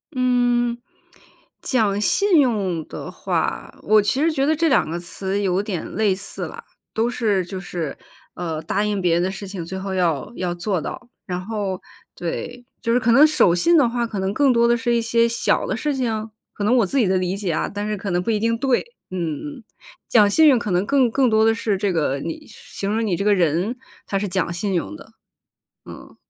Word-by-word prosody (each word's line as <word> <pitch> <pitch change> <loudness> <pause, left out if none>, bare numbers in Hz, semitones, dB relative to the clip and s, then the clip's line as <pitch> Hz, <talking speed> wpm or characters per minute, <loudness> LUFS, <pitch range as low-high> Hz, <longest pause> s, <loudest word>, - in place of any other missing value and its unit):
嗯， 245 -1 +2 0.8
讲 210 -6 +1
信 370 - +4
用 195 - 0
的 - - -7
话， - - -2
我 215 +1 +4
其 255 +7 0
实 325 - +3
觉 275 -2 0
得 310 - +3
这 325 +2 +1
2 265 - +3
个 170 +1 -3
词 190 +3 -3
有 195 0 +1
点 195 -6 -4
类 210 -3 +2
似 190 - -6
啦。 - - -10 0.3
都 230 +2 +1
是 205 -7 0
就 190 - -6
是 175 -5 -5 0.4
呃 165 -3 -4
答 200 +5 0
应 210 -2 -1
别 175 -2 +2
人 175 - +2
的 190 - -1
事 195 +1 -7
情， 190 -3 -6
最 190 +3 -6
后 190 0 -4
要 165 - 0
要 180 -1 -2
做 175 -1 -2
到。 245 - -7 0.2
然 180 -2 -3
后 200 -3 -3 0.3
对， 245 +8 -5 0.2
就 230 - -1
是 245 - +4
可 235 -2 +2
能 285 +5 +8
守 300 - +4
信 335 - +4
的 275 - +5
话 235 0 -1
可 220 -3 -5
能 190 +1 -1
更 275 +3 +3
多 235 -1 +3
的 240 - +4
是 240 0 0
一 235 - +2
些 230 +1 +2
小 235 - +1
的 - - -2
事 295 -2 -1
情？ 225 -4 -2 0.2
可 205 - -3
能 240 +4 +3
我 230 - +4
自 275 - -2
己 225 - +3
的 190 0 +2
理 185 +1 -1
解 195 -5 -2
啊， - - -1
但 205 +1 -3
是 215 - -1
可 200 -1 -5
能 175 0 +1
不 180 - -4
一 215 -2 +1
定 230 +1 +1
对。 255 0 +1 0.3
嗯 185 - -3 0.2
嗯 290 - -7
嗯， - - -17 0.5
讲 210 -3 +5
信 315 +9 +5
用 255 -4 +4
可 210 - -4
能 180 +2 +1
更 260 0 +3
更 260 +1 +2
多 220 0 +4
的 225 - +4
是 210 -3 -1
这 200 0 0
个 145 -4 0
你 165 +4 -6
是 - - -15
形 200 - -2
容 225 +1 0
你 190 -5 0
这 200 - -2
个 210 - +5
人 180 - 0 0.3
他 195 - -1
是 205 - -2
讲 180 -2 -1
信 190 +3 -2
用 145 - -2
的。 - - -16 0.7
嗯。 - - -12
210 Hz, 245 characters per minute, -22 LUFS, 185-240 Hz, 0.8 s, 能